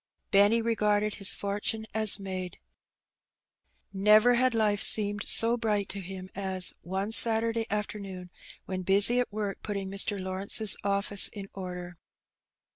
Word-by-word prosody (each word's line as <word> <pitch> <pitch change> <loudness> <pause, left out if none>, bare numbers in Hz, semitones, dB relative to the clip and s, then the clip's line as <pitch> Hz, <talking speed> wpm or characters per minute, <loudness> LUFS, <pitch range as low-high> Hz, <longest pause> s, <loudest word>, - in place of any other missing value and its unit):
Benny 205 +3 +2
regarded 210 -2 -1
his 200 - +5
fortune 205 +2 -4
as 215 -1 +5
made. 185 -2 -7 1.4
Never 210 +5 +3
had 250 0 0
life 210 -2 0
seemed 205 -1 0
so 230 +1 +4
bright 210 -4 -3
to 200 - -8
him 185 0 -10
as, 190 -2 -1
one 190 +4 -5
Saturday 225 0 +5
afternoon, 200 -3 -7 0.3
when 185 -1 -6
busy 200 +6 +3
at 250 - -3
work 205 -1 -6
putting 200 -2 -6
Mr. 200 +1 0
Lawrence's 190 +3 0
office 200 0 +2
in 195 -2 -11
order. 180 -2 -9
205 Hz, 130 wpm, -26 LUFS, 190-215 Hz, 1.4 s, his